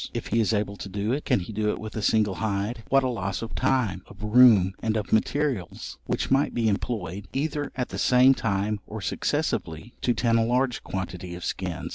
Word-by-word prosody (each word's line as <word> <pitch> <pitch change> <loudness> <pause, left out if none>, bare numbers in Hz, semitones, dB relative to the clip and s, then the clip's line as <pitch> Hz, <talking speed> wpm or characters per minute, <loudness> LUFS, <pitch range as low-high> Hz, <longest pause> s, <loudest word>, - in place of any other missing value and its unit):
If - - -4
he 115 - +2
is 110 -4 +2
able 105 -2 -1
to 100 - -7
do 100 +3 -2
it, 145 - -3
can - - +2
he 100 +5 -7
do 105 0 0
it - - -1
with 110 -1 -7
a 110 - -2
single 105 -1 +2
hide? 110 +2 -1
What 135 0 +4
a - - +1
loss 100 -4 -3
of 115 - -6
time, 125 -8 +1
of 100 - -13
room, 105 -4 +6
and 110 -1 0
of 105 - -3
materials, 125 - -1
which - - -2
might 135 +2 +2
be 115 -2 +1
employed, 100 -3 -2
either 145 +1 -2
at 125 -1 -2
the - - -5
same 125 +1 +6
time 105 -3 -1
or - - -6
successively, 80 +10 -2
to 120 - +1
tan 115 0 +2
a - - +3
large 125 +2 0
quantity 90 -2 -5
of 90 - -7
skins! - - -3
110 Hz, 215 wpm, -26 LUFS, 100-125 Hz, -, room